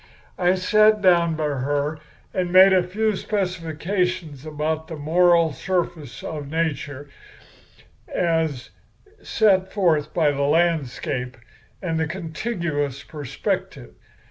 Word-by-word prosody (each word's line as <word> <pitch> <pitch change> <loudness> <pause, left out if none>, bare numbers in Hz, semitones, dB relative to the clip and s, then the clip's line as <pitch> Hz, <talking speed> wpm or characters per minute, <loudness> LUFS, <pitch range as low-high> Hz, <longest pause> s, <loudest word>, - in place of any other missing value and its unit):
"I 180 0 +3
sat 215 +3 +4
down 170 -3 +4
by 155 - -3
her 145 +2 -1 0.3
and 180 -2 -1
made 190 +1 +8
a 185 - +5
few 210 +4 -1
specifications 180 -5 -2
about 155 +1 -2
the 165 - -6
moral 165 +1 +3
surface 170 -3 -3
of 145 -3 -6
nature 145 -3 -3 1.0
as 160 -6 -1 0.5
set 190 -4 +2
forth 160 -7 +1
by 155 -4 +2
the 140 0 -3
landscape 140 -5 0 0.5
and 165 -3 -1
the 160 - 0
contiguous 160 - -3
perspective. 130 - -4
165 Hz, 110 wpm, -23 LUFS, 145-180 Hz, 1.0 s, made